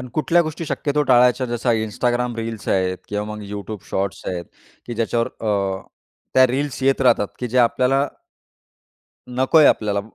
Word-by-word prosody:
अन् 125 - -7
कुठल्या 165 +3 +3
गोष्टी 155 +1 -5
शक्यतो 150 0 0
टाळायच्या 125 -1 +4
जसं 120 +1 -1
Instagram 120 +2 -1
रील्स 115 -1 -5
आहेत 95 -1 +1
किंवा 105 0 -2
मग 105 - -8
YouTube 105 0 -6
शॉर्ट्स 95 0 -2
आहेत, 85 -2 -3 0.4
की 120 - -5
ज्याच्यावर 115 +1 0
अ, 100 -3 -1 0.5
त्या 130 0 +7
रील्स 135 +2 -3
येत 135 +1 +2
राहतात 120 -6 +3
की 125 - -3
जे 125 - 0
आपल्याला 130 +3 +3 1.2
नकोय 130 +5 +4
आपल्याला. 100 -2 +2
120 Hz, 155 wpm, -21 LUFS, 105-130 Hz, 1.2 s, त्या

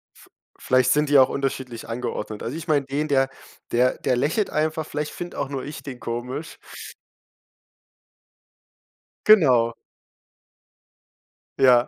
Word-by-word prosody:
V - - -19 0.3
vielleicht 130 -1 +3
sind 150 0 +2
die 145 - +6
auch 130 - +6
unterschiedlich 130 -4 -4
angeordnet. 110 -2 -4
Also 125 +6 -4
ich 165 +1 -7
meine 145 -3 +2
den, 145 +3 -2
der 135 -2 +2 0.4
der 125 +2 +2
der 130 - +1
lächelt 150 - 0
einfach, 155 +1 -1
vielleicht 150 0 -4
finde 175 0 -7
auch 140 - -2
nur 135 -2 -4
ich 145 +1 -8
den 130 -3 -8
komisch. 125 +6 -5 2.7
Genau. 130 - +6 1.9
Ja. 125 -2 +6
135 Hz, 125 wpm, -23 LUFS, 125-150 Hz, 2.7 s, die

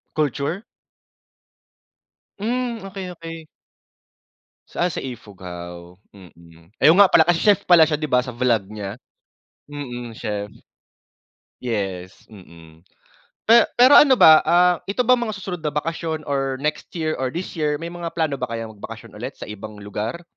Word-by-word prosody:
Culture? 150 - -1 1.8
Hmm, 235 0 -2
okey, 190 -1 -7
okey. 165 -2 -9 1.2
Saan 175 +1 -1
sa - - -4
Ifugao? 90 -7 -9 0.2
Mm, 85 -3 -18
ay - - +6
oo 175 - +4
nga 200 - +8
pala 160 - +5
kasi 170 0 +1
chef 205 -3 +3
pala 170 -3 +6
siya 150 - 0
'di 155 0 -4
ba 125 - +4
sa 125 -1 -7
vlog 120 -5 +1
niya? 105 +1 -7 0.7
Mm, 125 -5 -7
chef. 105 -2 -5 1.1
Yes, 95 -5 -4
mm. 85 -5 -16 0.7
Pe 230 +1 +7
pero 255 +4 +7
ano 275 -3 +7
ba, 160 -10 +7
ah, 175 +2 +4
ito 205 +6 0
ba 250 +1 +4
mga 225 -3 -3
susunod 185 -4 -6
na 150 -1 -2
bakasyon 160 +1 -3
or 135 -1 -1
next 150 0 -2
year, 160 -2 -2
or 130 -1 -2
this 175 0 -5
year 150 -1 0
may 170 +1 -5
mga 175 -1 -6
plano 155 -5 -1
ba 125 - -2
kayong 115 -2 -6
magbakasyon - - -10
ulit - - -6
sa - - -10
ibang 105 0 -9
lugar? 105 - -5
145 Hz, 155 wpm, -22 LUFS, 105-175 Hz, 1.8 s, nga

